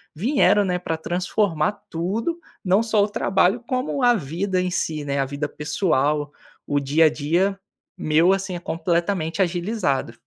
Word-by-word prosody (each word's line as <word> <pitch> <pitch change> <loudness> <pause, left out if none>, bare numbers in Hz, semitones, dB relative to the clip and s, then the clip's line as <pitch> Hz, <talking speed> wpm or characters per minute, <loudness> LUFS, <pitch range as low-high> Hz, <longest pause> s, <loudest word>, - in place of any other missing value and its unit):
vieram, 210 - +3
né, 180 -2 -1
pra 165 -2 -2
transformar 175 0 0 0.2
tudo, 215 - -2 0.2
não 190 +3 +3
só 220 -3 +2
o 205 - -1
trabalho 195 +2 +1
como 260 +2 -1
a 245 -1 +5
vida 185 - -1
em 180 - -1
si, 155 -4 -2
né, 140 -1 -2
a 135 - +1
vida 140 +2 -4
pessoal, 150 -2 0 0.3
o 145 - 0
dia 145 +4 +3
a - - +4
dia, 170 +7 0 0.4
meu, 160 +5 +3
assim, 190 -1 -3
é - - -4
completamente 170 0 -1
agilizado. 175 - -1
175 Hz, 160 wpm, -23 LUFS, 155-200 Hz, 0.4 s, a